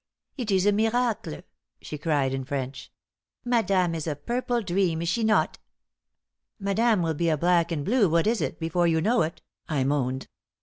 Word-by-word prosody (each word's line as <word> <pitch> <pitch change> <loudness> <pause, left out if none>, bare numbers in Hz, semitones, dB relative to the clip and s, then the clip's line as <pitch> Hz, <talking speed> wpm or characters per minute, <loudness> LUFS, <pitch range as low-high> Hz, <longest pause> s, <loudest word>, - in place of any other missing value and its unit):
"It 245 -6 -4
is 190 -1 +2
a 205 - +5
miracle!" 225 - 0 0.4
she 150 - -7
cried 145 -4 +1
in 135 0 -2
French. 135 -1 -5 0.5
"Madame 195 -7 +2
is 160 -1 -4
a 150 - -1
purple 240 - -2
dream, 175 -3 0
is 170 - -1
she 230 +5 0
not?" 220 -1 +2 1.0
"Madame 205 0 +1
will 165 -1 0
be 170 +2 0
a 155 - +2
black 170 +1 +2
and 145 -4 -2
blue 220 -4 +3
what 165 +1 +2
is 225 +1 +1
it - - -3
before 170 +1 +1
you 160 -1 +2
know 225 +7 +2
it," 160 +1 -3 0.3
I 145 -4 +1
moaned. 130 -1 -1
175 Hz, 180 wpm, -26 LUFS, 155-215 Hz, 1.0 s, a